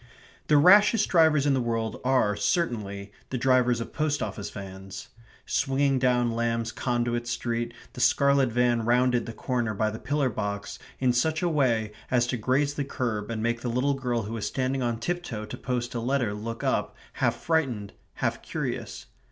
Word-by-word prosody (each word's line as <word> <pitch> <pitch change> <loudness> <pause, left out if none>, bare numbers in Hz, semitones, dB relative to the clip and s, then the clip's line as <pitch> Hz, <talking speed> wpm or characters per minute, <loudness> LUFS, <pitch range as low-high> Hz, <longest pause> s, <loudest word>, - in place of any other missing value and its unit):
The 150 - +5
rashest 205 +7 +6
drivers 160 -4 +4
in 145 - +3
the 130 - +1
world 115 -2 -2
are, 125 -5 +2
certainly, 105 - -1 0.2
the 130 - -2
drivers 125 -1 +3
of 115 - -6
post 150 -2 0
office 100 -1 -5
vans. 95 -1 -9 0.4
Swinging 135 0 +1
down 125 -2 +2
Lamb's 115 0 -1
Conduit 120 -1 -1
Street, 120 -1 -2 0.2
the 125 - -6
scarlet 140 -1 +4
van 120 -1 +2
rounded 125 +1 +2
the - - -4
corner 115 -1 -2
by 110 +2 0
the 110 - -7
pillar 145 -1 0
box 100 -1 -4 0.2
in 130 -2 +2
such 155 +7 +1
a 175 - +2
way 120 -8 +1 0.2
as 125 -2 +3
to 125 +1 -2
graze 135 +5 +1
the 145 - -2
kerb 115 -6 -3
and 110 -1 -3
make 115 0 0
the 120 - -2
little 130 +4 +1
girl 125 -4 -1
who 105 +3 -6
was 115 -2 -3
standing 130 0 -1
on 120 -2 0
tiptoe 135 -6 -3
to - - -7
post 125 -1 -3
a 120 - -2
letter 120 -3 0
look 115 +2 -6
up, - - 0 0.2
half - - +1
frightened, 130 -12 -1 0.2
half - - -1
curious. - - -4
120 Hz, 180 wpm, -27 LUFS, 115-135 Hz, 0.4 s, rashest